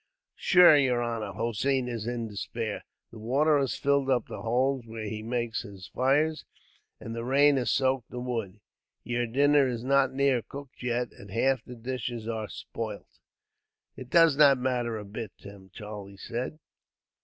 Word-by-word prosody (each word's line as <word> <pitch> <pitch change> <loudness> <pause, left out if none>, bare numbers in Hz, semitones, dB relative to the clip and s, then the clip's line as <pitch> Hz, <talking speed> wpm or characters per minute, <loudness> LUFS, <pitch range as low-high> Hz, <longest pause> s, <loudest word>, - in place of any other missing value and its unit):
"Shure, 175 -4 +7
yer 130 -4 +2
honor, 115 -4 -3
Hossein 120 +5 -1
is 115 -2 -4
in 120 -1 -3
despair. 110 +1 -4 0.3
The 115 - -11
water 145 +7 +2
has 135 -2 -1
filled 140 -1 +1
up 130 -2 +2
the - - -8
holes, 130 +3 +1
where 110 0 -6
he 110 +1 -4
makes 120 0 -2
his 100 -5 -11
fires, 150 +5 +2 0.6
and 115 - -7
the 115 - -4
rain 140 +3 +4
has 125 -4 0
soaked 130 -3 +1
the 125 - -6
wood. 115 -5 -4 0.4
Yer 120 0 -1
dinner 140 +3 +4
is 120 -2 -3
not 135 0 +3
near 135 -2 +2
cooked 140 +2 -11
yet, 125 0 -1
and 100 - -14
half 125 +4 +1
the 125 - -10
dishes 120 -1 -5
are 110 -2 -3
spoilt." 110 -3 -7 0.8
"It 130 - -10
does 165 -2 +5
not 140 -3 +7
matter 125 -3 -1
a 105 - -7
bit, 105 0 -7
Tim," 100 -1 -13
Charlie 105 -1 -9
said. 125 +9 -5
120 Hz, 165 wpm, -28 LUFS, 110-135 Hz, 0.8 s, Shure